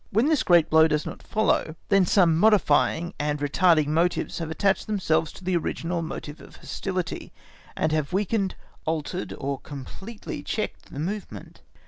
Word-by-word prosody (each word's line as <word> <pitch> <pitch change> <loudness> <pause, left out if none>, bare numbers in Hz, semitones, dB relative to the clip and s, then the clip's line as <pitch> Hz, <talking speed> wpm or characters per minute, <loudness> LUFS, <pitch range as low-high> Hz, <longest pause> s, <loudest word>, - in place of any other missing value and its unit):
When 225 +5 +2
this 305 -2 +3
great 170 -3 +5
blow 160 0 +6
does 150 -1 0
not - - -7
follow, 215 -7 0
then 195 -3 +4
some 175 -5 +4
modifying, 175 -2 +3
and 150 0 0
retarding 155 +2 +3
motives 170 +4 0
have 165 -2 -4
attached 190 +4 +1
themselves 180 -7 +1
to - - -13
the 185 0 0
original 170 +1 -2
motive 155 -1 -6
of - - -14
hostility, 185 -3 -4 0.5
and 155 - +1
have 155 -2 0
weakened, 195 +1 0 0.3
altered 160 +3 -2
or 140 -1 -3
completely 190 - -8
checked 215 - -4
the - - -9
movement. 195 +7 -6
170 Hz, 155 wpm, -25 LUFS, 155-195 Hz, 0.5 s, blow